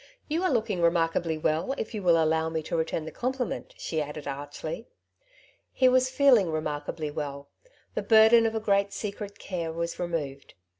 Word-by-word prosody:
" - - -42
You 330 - +1
are 370 - +2
looking 220 -8 0
remarkably 165 -1 +1
well, 160 - 0
if 220 - -4
you 210 - -3
will 170 -3 +4
allow 160 0 +2
me 160 -1 -3
to 160 - -3
return 160 -1 -1
the 160 - -6
compliment/^ 255 -1 -3
she 160 -2 -2
added 150 0 -6
archly. 145 - -6 0.8
He 260 - +3
was 255 0 +4
feeling 255 -8 +5
remarkably 155 0 -3
well. 140 -1 -5 0.4
The - - -1
burden 225 +1 +6
of 225 - -3
a - - +1
great 200 -2 +1
secret 205 -1 -5
care 170 -4 -4
was 170 +1 -4
removed. 150 -6 -4
170 Hz, 180 wpm, -27 LUFS, 155-220 Hz, 0.8 s, burden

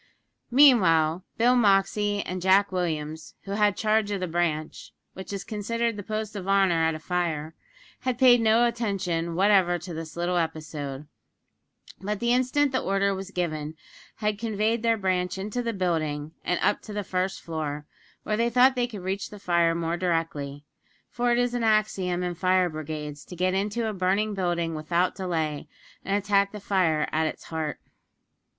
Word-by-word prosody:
Meanwhile, 185 - +5
Bill 245 +2 +4
Moxey 205 -2 +2
and 185 0 -5
Jack 190 +2 +4
Williams, 160 -3 -3
who 195 - -7
had 205 -1 +2
charge 215 -1 +1
of 200 -1 -2
the 185 - -1
branch 160 -2 -2 0.2
which 190 +1 -8
is 200 -1 -4
considered 230 +2 -2
the 205 - -5
post 215 +1 -4
of 195 -2 -6
honour 190 -4 +3
at 160 0 +1
a - - -6
fire 160 -2 -2 0.5
had 255 -2 -2
paid 245 -2 +6
no 225 +2 +4
attention 190 -8 -2
whatever 190 -2 +4
to 175 +1 -8
this 165 0 -7
little 175 +1 0
episode; 155 -4 -4 0.9
but 205 +1 -3
the 235 0 +2
instant 255 +3 +2
the 260 - 0
order 195 0 +1
was 190 0 -6
given, 155 -5 -3 0.4
had 210 -1 -2
conveyed 220 0 0
their 230 -1 +2
branch 185 -2 -1
into 210 +5 -3
the 235 -1 -2
building, 160 -6 -2
and 180 - 0
up - - +2
to 215 - -9
the 205 0 -2
first 185 +1 -2
floor, 150 -3 -4 0.4
where 215 - -1
they 235 +1 +2
thought 250 +2 +5
they 245 -1 +1
could 210 -6 -8
reach 195 +2 -3
the 210 - -10
fire 170 -3 +2
more 170 0 -1
directly; 155 -5 -2 0.5
for 245 0 0
it 240 - +3
is 245 0 +1
an 240 -1 -1
axiom 200 -5 +1
in 180 0 -2
fire 185 +1 +2
brigades 150 -1 -6
to 180 - -10
get 185 +1 +1
into 210 +4 -1
a 215 - -2
burning 195 +3 0
building 175 -3 -1
without 170 +3 0
delay, 160 -5 -3 0.4
and 195 +1 0
attack 200 -1 +2
the 210 - -7
fire 175 -7 +1
at 160 0 +1
its - - -6
heart. 160 -2 -4
190 Hz, 175 wpm, -26 LUFS, 165-210 Hz, 0.9 s, paid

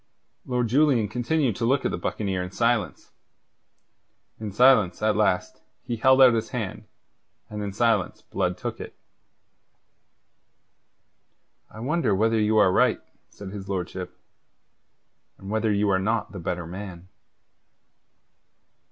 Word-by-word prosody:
Lord 125 -2 0
Julian 130 -3 +3
continued 120 +2 0
to 115 - -1
look 135 +4 +1
at - - +1
the - - -3
buccaneer 95 -3 -2
in 90 - -5
silence. 115 -3 -1 1.3
In 110 -2 -5
silence, 105 -5 +4
at 110 0 +2
last, 95 -4 0 0.2
he 120 - -3
held 130 +3 +5
out 125 -2 +7
his 115 -1 -2
hand; 110 -7 -5 0.7
and 105 0 -5
in 100 -1 -4
silence 110 -2 0
Blood - - -2
took - - -5
it. - - -9 2.7
"I 110 - -11
wonder 130 - 0
whether 110 +3 +2
you 110 +1 +2
are 95 -3 +5
right," - - +3 0.3
said 100 -2 -10
his 100 -1 -8
lordship, 90 -1 -5 1.2
"and 95 +1 -9
whether 110 0 0
you 105 0 +1
are 95 - +2
not 110 +3 -1
the 100 - -8
better 85 0 -4
man." 90 0 -8
110 Hz, 135 wpm, -25 LUFS, 95-120 Hz, 2.7 s, out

